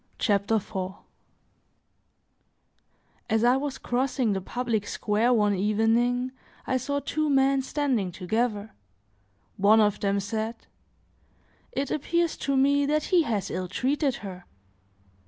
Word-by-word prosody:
CHAPTER 205 0 +1
IV 190 -2 -3 2.4
AS 220 0 +2
I 245 +1 +5
was 275 0 -3
crossing 245 -2 0
the 190 - -2
public 225 0 -2
square 215 +4 +1
one 210 -4 +3
evening, 225 +5 +1 0.3
I 260 - +1
saw 285 +2 -2
two 310 +1 -1
men 270 0 +3
standing 260 -9 -1
together; 210 +3 -2 0.9
one 205 +3 +5
of 210 -1 +2
them 200 0 +1
said: 220 +3 -3 1.2
"It 280 - -2
appears 340 +3 0
to 275 -1 -1
me 280 +1 +3
that 305 +1 +1
he 355 - +6
has 220 - -2
ill 185 0 -3
treated 265 - 0
her." 180 -2 -8
235 Hz, 120 wpm, -26 LUFS, 205-275 Hz, 2.4 s, he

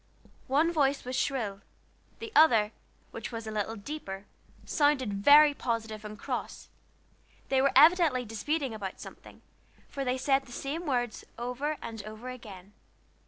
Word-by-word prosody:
One 300 +6 +3
voice 280 -4 +1
was 255 +1 -4
shrill; 220 -9 -1 0.6
the 455 -1 -8
other, 225 - +6 0.4
which - - -6
was 230 -1 -6
a 220 - -5
little 215 +1 -2
deeper, 200 -4 -7 0.4
sounded 290 -7 +1
very 290 +9 +7
positive 225 -5 -3
and 210 0 -8
cross. - - -5 0.8
They 265 -1 +3
were 275 0 +3
evidently 305 -4 +6
disputing 265 +5 -2
about 200 -3 -6
something, - - -12 0.4
for 275 - -4
they 255 0 0
said 270 0 +1
the - - -13
same 305 +7 -4
words 245 -4 -1
over 250 +6 -3
and 225 -2 -6
over 215 +4 -8
again. 205 -6 -11
250 Hz, 145 wpm, -29 LUFS, 215-285 Hz, 0.8 s, very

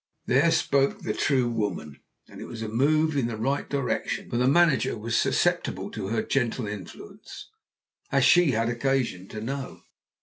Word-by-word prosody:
There 135 +7 +3
spoke 140 -4 +1
the - - -2
true 130 -4 +1
woman. 105 -10 -3 0.3
And - - -12
it - - -6
was 115 -1 -7
a - - -3
move 155 +7 +2
in 135 -4 +1
the 115 -2 -5
right 135 +6 -2
direction, 140 -3 -2
for 120 - -1
the 125 +1 +2
manager 150 -4 +3
was 115 +2 -3
susceptible - - 0
to - - -5
her 115 +3 -1
gentle 125 -2 -1
influence, 100 -1 -10 0.6
as 135 -1 +3
she 175 0 +5
had 115 +1 0
occasion 120 -6 -1
to 110 - -7
know. 135 +4 -5
125 Hz, 170 wpm, -26 LUFS, 115-140 Hz, 0.6 s, she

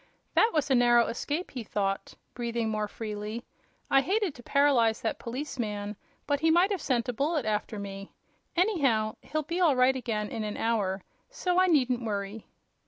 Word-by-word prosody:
"That 445 - +5
was 295 -3 0
a - - +6
narrow 240 -1 +5
escape," 295 +9 -3
he 250 -4 -5
thought, 195 -2 -2 0.2
breathing 235 -2 -2
more 215 -1 -1
freely. 215 +1 -5 0.5
"I 270 - +6
hated 390 +3 0
to 245 - -12
paralyze 245 -5 +3
that 225 - -2
policeman, 230 -5 -4 0.3
but 285 -1 +1
he 320 +2 +3
might 350 +5 +4
have 385 -5 -1
sent 240 -4 0
a 245 - -1
bullet 295 +3 0
after 215 0 -1
me. 195 0 -7 0.4
Anyhow, 275 - +2
he'll 310 +1 -2
be 335 +4 -3
all 315 -6 +5
right 255 +1 +4
again 220 -5 -2
in 225 -2 -4
an 210 -1 -4
hour, 200 -5 0 0.3
so 365 -7 0
I 370 - +4
needn't 255 -7 +2
worry." 205 0 -4
240 Hz, 175 wpm, -29 LUFS, 215-290 Hz, 0.5 s, a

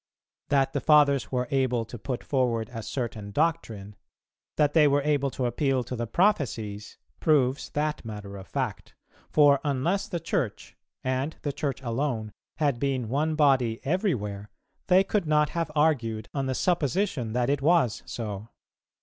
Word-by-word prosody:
That 135 -2 +2
the 140 - -1
Fathers 145 -3 +4
were 125 -1 -1
able 130 -4 +1
to 115 +1 -9
put 125 +2 -4
forward 120 -5 0
a 115 - -4
certain 110 -2 -4
doctrine, 110 -7 -1 0.6
that 145 -1 +3
they 155 -3 +6
were 140 0 +2
able 145 -2 +1
to 130 -1 -3
appeal 130 +1 +1
to 125 - -5
the 120 -1 -3
prophecies, 115 - 0 0.2
proves 140 -3 +2
that 150 +1 -1
matter 105 -3 -7
of 95 -1 -9
fact; - - -4 0.3
for 145 -2 +5
unless 150 +8 0
the 175 - -3
Church, 145 - -3 0.3
and 130 +4 -1
the 145 - -2
Church 140 -2 -3
alone, 115 -3 -2 0.3
had 145 -6 +1
been 130 -4 -1
one 155 +5 0
body 130 -7 +3
everywhere, 110 - -1 0.4
they 185 +1 +6
could 195 -3 -1
not 150 -1 +3
have 165 -2 -2
argued 120 -8 +1
on 135 -2 -1
the 130 - -1
supposition 155 - 0
that 125 +2 +1
it 140 -1 0
was 150 -7 +3
so. 105 -2 -5
135 Hz, 160 wpm, -27 LUFS, 115-150 Hz, 0.6 s, they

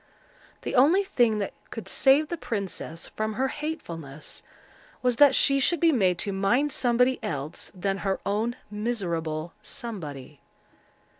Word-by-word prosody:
The - - -3
only 310 +10 +5
thing 240 - +2
that 200 - -2 0.2
could - - -7
save 285 +3 +4
the 345 - -1
princess 195 - -4
from 215 0 -2
her 265 +5 0
hatefulness, 165 - -6 0.6
was 250 -2 +2
that 290 0 +7
she 275 0 +4
should 340 +5 +2
be 335 -1 +5
made 190 - +2
to 200 - -2
mind 240 +10 +2
somebody 250 +1 +2
else 145 +1 -4
than 195 +1 -1
her 195 -1 -1
own 220 +4 0 0.2
miserable 170 -8 -2
Somebody. 155 - -6
215 Hz, 140 wpm, -27 LUFS, 175-265 Hz, 0.6 s, that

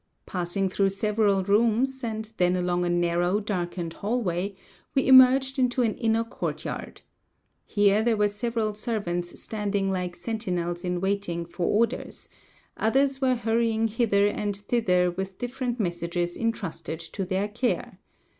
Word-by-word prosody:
Passing 180 +2 -1
through 195 +1 +1
several 205 -1 +1
rooms, 235 +6 +2
and 220 -1 -4
then 180 0 +3
along 180 0 0
a - - 0
narrow, 175 +2 +1
darkened 175 -5 -3
hallway, 200 -4 -2 0.4
we 270 - +3
emerged 265 +1 +6
into 250 0 +2
an 220 -2 +1
inner 225 -1 +1
courtyard. 230 - -5 0.7
Here 205 0 +3
there 225 -1 +2
were 210 0 +3
several 220 +1 -2
servants 200 -6 -3
standing 200 -2 -1
like 180 -2 -2
sentinels 180 -7 -3
in 180 -1 -2
waiting 190 -3 -1
for 170 +1 -3
orders; 230 +3 -1 0.5
others 270 +4 +1
were 260 -1 +3
hurrying 225 -1 +1
hither 210 -3 +2
and 205 -1 -1
thither 190 -5 +1
with 190 +1 -5
different 245 0 -3
messages 175 -2 -2
intrusted 200 -8 -3
to 170 +4 -5
their 190 +2 -1
care. 235 -2 -2
205 Hz, 135 wpm, -26 LUFS, 180-230 Hz, 0.7 s, emerged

